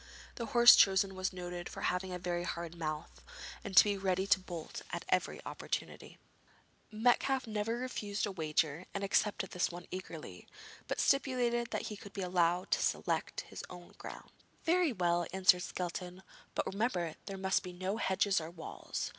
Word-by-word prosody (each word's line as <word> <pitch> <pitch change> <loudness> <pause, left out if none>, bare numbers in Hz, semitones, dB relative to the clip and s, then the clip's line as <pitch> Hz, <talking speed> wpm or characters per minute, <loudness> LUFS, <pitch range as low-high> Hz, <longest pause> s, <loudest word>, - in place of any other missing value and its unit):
The 235 - -5
horse 240 +1 +9
chosen 195 0 +5
was 185 0 -1
noted 175 -1 -6
for - - -8
having 185 +1 -1
a 180 - -3
very 175 -1 -2
hard 170 -1 -4
mouth, 155 - -5 0.4
and 190 - -5
to - - +12
be 205 -1 0
ready 190 0 +1
to 190 -1 +4
bolt 175 -4 -7
at - - -4
every - - +1
opportunity. - - -5 0.7
Metcalfe 245 +4 +2
never 220 +1 -1
refused 215 -5 -2
a 205 - -3
wager 160 -1 0
and 200 - -2
accepted 195 -1 +1
this 180 - +1
one 175 0 -8
eagerly, 185 0 -7 0.4
but - - -2
stipulated 245 -4 +2
that - - -2
he 210 - -5
should 200 0 -11
be 195 - -3
allowed 180 0 +1
to - - +3
select - - 0
his - - -9
own 180 -1 -10
ground. - - -9 0.3
'Very 345 -2 +3
well,' 175 -4 +1
answered 190 -1 +5
Skelton; 180 +1 -5 0.3
'but - - 0
remember 190 -6 -1
there 195 -1 -5
must 190 0 +1
be 185 - -7
no 185 +4 -3
hedges 190 -3 +2
or 160 - -6
walls. 165 -1 -5
190 Hz, 170 wpm, -33 LUFS, 175-210 Hz, 0.7 s, to